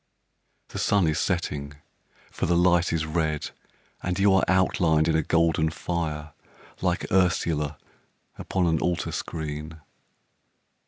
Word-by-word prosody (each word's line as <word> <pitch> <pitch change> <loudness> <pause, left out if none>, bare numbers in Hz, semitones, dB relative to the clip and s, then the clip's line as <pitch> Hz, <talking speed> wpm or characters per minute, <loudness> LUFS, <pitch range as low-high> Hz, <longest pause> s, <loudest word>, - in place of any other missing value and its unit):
The - - -6
sun 100 -3 +3
is 80 -1 +1
setting, 75 -6 -2 0.6
for - - -2
the 85 0 +3
light 90 0 +3
is 80 -1 0
red, 80 -1 -1 0.5
And 90 0 -2
you 100 0 +4
are 95 - +4
outlined 85 -4 +3
in 80 - +2
a 80 - +3
golden 80 0 +2
fire, 80 -2 -4 0.5
Like 90 -1 0
Ursula 80 -5 +1 0.6
upon 95 -2 -1
an 80 -2 +2
altar 90 -1 -1
screen. 80 0 -5
80 Hz, 125 wpm, -26 LUFS, 80-90 Hz, 0.6 s, you